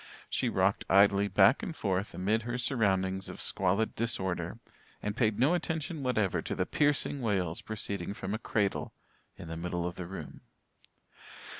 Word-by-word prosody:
She - - +1
rocked - - +2
idly 100 +1 +5
back 100 +6 +5
and 165 - -5
forth 95 -3 -1
amid 105 +5 +1
her 120 +2 -3
surroundings 95 -7 +1
of - - -8
squalid 100 +4 +1
disorder, 95 -5 -2 0.4
and 105 0 -3
paid 110 -4 +2
no 135 +8 +4
attention 160 -3 -2
whatever 110 -7 +1
to - - -4
the - - 0
piercing 145 -1 +1
wails 95 -7 0
proceeding 100 -3 -4
from 95 0 -4
a 110 - -2
cradle 105 -3 -1 0.4
in 85 - -9
the 80 0 -5
middle 90 0 -2
of 90 0 -4
the 90 - -5
room. 95 +1 -8
100 Hz, 160 wpm, -31 LUFS, 95-120 Hz, 0.4 s, idly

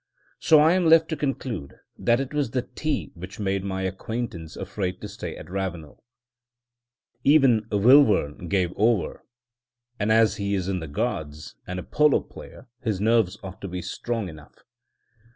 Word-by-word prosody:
So 155 - +6
I 155 +3 +5
am 180 -2 +2
left 160 0 +6
to 160 - -1
conclude 130 - -4 0.2
that 120 +1 +2
it 135 +1 -4
was 145 -4 0 0.2
tea 155 -3 -2
which 90 +4 -10
made 100 -1 -1
my 95 -1 -3
acquaintance 95 -3 -4
afraid 95 -1 -4
to - - -5
stay - - -7
at - - -10
Ravenel. 90 -5 -5 1.2
Even 135 -7 +4
Wilvern 105 - +4
gave 90 -3 +1
over; 110 -2 +1 0.8
and 105 +1 +1
as 110 0 +4
he 100 0 -1
is 95 -2 -2
in 95 -2 -1
the 80 - -6
Guards, 75 +1 -4
and 90 - -4
a - - -6
polo 150 -1 +3
player 125 - -13
his 110 -5 -1
nerves 110 -2 +2
ought 95 0 -9
to 100 - -5
be 90 -1 -5
strong 115 0 -3
enough. 75 -3 -13
100 Hz, 160 wpm, -25 LUFS, 90-120 Hz, 1.2 s, So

